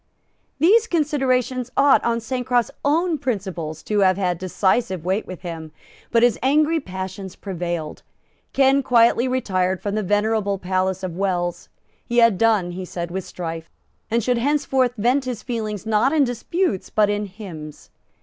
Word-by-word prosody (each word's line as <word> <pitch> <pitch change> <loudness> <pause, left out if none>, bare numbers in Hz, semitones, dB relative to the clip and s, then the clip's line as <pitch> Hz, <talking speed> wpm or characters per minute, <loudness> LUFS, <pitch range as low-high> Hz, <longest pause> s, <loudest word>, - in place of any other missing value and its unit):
These 425 +10 +4
considerations 260 - 0
ought, 280 0 +5
on 235 0 0
Sancroft's 245 -1 0
own 320 +2 +1
principles, 190 - -4
to 210 -1 0
have 185 -1 +4
had 180 -3 -1
decisive 185 -1 0
weight 190 +4 -1
with 185 - -8
him; 165 -3 -7 0.4
but 230 0 +3
his 240 -3 +3
angry 305 +5 +3
passions 190 - -7
prevailed. 175 -5 -4 0.5
Ken 275 0 +4
quietly 240 -1 +4
retired 190 -8 0
from 205 - -3
the 215 - 0
venerable 205 0 0
palace 185 0 -1
of 180 -3 -4
Wells. 180 -3 -2 0.3
He 240 - -3
had 230 -5 +5
done, 215 -6 +2
he 185 +2 -6
said, 170 -1 -5
with 190 0 -4
strife, 165 -2 -6 0.4
and 230 0 +1
should 245 +1 +1
henceforth 265 -2 +1
vent 250 +6 +2
his 250 -4 -4
feelings 215 -4 -4
not 220 +4 +2
in 305 -2 +3
disputes 245 - -1
but 215 -1 +3
in 205 0 -2
hymns. 175 -7 -10
215 Hz, 155 wpm, -22 LUFS, 185-255 Hz, 0.5 s, ought